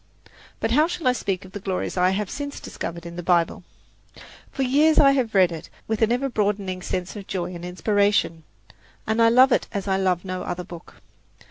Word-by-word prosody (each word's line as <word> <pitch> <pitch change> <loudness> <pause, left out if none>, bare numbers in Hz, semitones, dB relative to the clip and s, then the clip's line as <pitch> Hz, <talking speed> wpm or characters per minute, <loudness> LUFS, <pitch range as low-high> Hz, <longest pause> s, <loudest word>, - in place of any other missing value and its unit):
But 225 - -1
how 300 +6 +4
shall 335 -5 -3
I - - +6
speak 195 -6 -3
of 185 - -13
the 205 - -6
glories 190 -1 -3
I 180 0 +3
have 200 +2 -1
since 285 +6 -6
discovered 170 0 -6
in 170 0 -8
the - - -3
Bible? 175 0 +1 0.9
For 270 - -2
years 295 +5 +3
I 275 -2 +7
have 250 -6 0
read 185 -2 +5
it 165 -2 -8 0.2
with 220 0 -2
an 225 +1 +3
ever 250 +3 +1
broadening 200 -5 -1
sense 180 +2 -4
of 200 -2 -8
joy 180 -1 -3
and 175 -1 -8
inspiration; 200 -2 +1 0.6
and 220 +1 +1
I 230 - +6
love 255 +3 +6
it - - +2
as 200 -1 -4
I 190 -1 +2
love 185 -1 0
no 185 -1 -4
other 180 0 -4
book. 170 -2 -12
195 Hz, 210 wpm, -23 LUFS, 180-235 Hz, 0.9 s, I